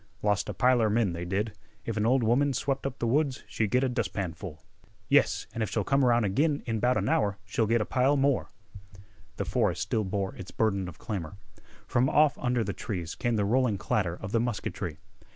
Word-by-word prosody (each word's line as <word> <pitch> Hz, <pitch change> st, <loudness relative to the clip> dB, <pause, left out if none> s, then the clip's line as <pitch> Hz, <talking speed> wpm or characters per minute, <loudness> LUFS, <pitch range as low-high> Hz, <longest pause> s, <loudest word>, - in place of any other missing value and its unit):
"Lost 105 Hz, -1 st, +1 dB
a -, -, -2 dB
piler 125 Hz, -4 st, +3 dB
men, 110 Hz, -5 st, +2 dB
they 85 Hz, +1 st, -4 dB
did. 100 Hz, +4 st, -1 dB, 0.3 s
If 115 Hz, -, -3 dB
an 105 Hz, 0 st, +1 dB
ol' 130 Hz, +3 st, +4 dB
woman 130 Hz, +4 st, +2 dB
swep' 135 Hz, +2 st, -1 dB
up 135 Hz, -, -6 dB
th' -, -, -7 dB
woods 135 Hz, +3 st, +1 dB
she'd 110 Hz, -2 st, -1 dB
git 125 Hz, +5 st, +2 dB
a -, -, +3 dB
dustpanful." 90 Hz, -, -3 dB, 0.5 s
"Yes, -, -, +3 dB
an' 115 Hz, -, -4 dB
if 110 Hz, -, 0 dB
she'll -, -, 0 dB
come 135 Hz, 0 st, +2 dB
around 120 Hz, -3 st, +4 dB
ag'in 145 Hz, +9 st, +1 dB
in 115 Hz, -2 st, -1 dB
'bout 125 Hz, +3 st, +2 dB
an -, -, 0 dB
hour 105 Hz, -11 st, +1 dB
she'll 110 Hz, +1 st, 0 dB
get 115 Hz, +1 st, +2 dB
a -, -, 0 dB
pile 135 Hz, +3 st, +2 dB
more." 140 Hz, -1 st, +1 dB, 0.9 s
The -, -, -2 dB
forest -, -, 0 dB
still 110 Hz, -, 0 dB
bore 95 Hz, 0 st, -2 dB
its 95 Hz, -, -8 dB
burden 100 Hz, -4 st, 0 dB
of 85 Hz, -3 st, -9 dB
clamor. 100 Hz, -5 st, -5 dB, 0.5 s
From 125 Hz, +3 st, +2 dB
off 155 Hz, -1 st, +4 dB
under 125 Hz, -2 st, +1 dB
the -, -, -3 dB
trees 90 Hz, -7 st, -4 dB
came 120 Hz, -1 st, -1 dB
the 105 Hz, -2 st, +1 dB
rolling 120 Hz, -1 st, +2 dB
clatter 95 Hz, -3 st, 0 dB
of 95 Hz, -, -6 dB
the 115 Hz, -, +2 dB
musketry. 105 Hz, -8 st, -3 dB
115 Hz, 210 wpm, -28 LUFS, 100-130 Hz, 0.9 s, ol